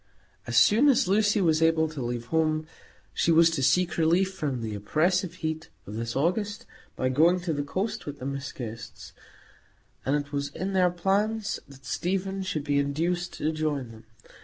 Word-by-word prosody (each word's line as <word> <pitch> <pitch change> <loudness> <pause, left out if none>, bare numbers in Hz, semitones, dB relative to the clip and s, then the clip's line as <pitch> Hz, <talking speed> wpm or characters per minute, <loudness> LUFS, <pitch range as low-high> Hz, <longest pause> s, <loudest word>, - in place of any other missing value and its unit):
As 120 0 0
soon 220 - +6
as 250 -9 +3
Lucy 210 +1 +3
was 160 -3 +3
able 160 0 +3
to 155 -3 -6
leave 120 -1 -3
home, 155 -1 +1 0.5
she 170 - +2
was 165 0 +6
to 155 -5 -1
seek 170 +5 +2
relief 175 +4 +3
from 140 -9 -3
the 110 -1 -3
oppressive 170 - 0
heat 160 -2 -4 0.2
of 100 - -8
this 115 +1 -4
August 200 +8 -1 0.3
by 130 - 0
going 165 +7 +4
to 175 -2 -2
the 145 - -1
coast 185 +9 -3
with 145 0 -5
the 130 - -8
Miss 140 0 -4
Guests; 115 -2 -8 0.9
and 135 - +1
it 145 -1 -3
was 140 -1 -2
in 190 +2 -3
their 185 -1 +4
plans 200 +4 0
that 135 -1 -16
Stephen 190 +5 -2
should 175 -6 -3
be 145 -1 +1
induced 170 +5 -1
to 155 - -1
join 150 -6 -2
them. 110 0 -14
160 Hz, 185 wpm, -27 LUFS, 140-185 Hz, 0.9 s, soon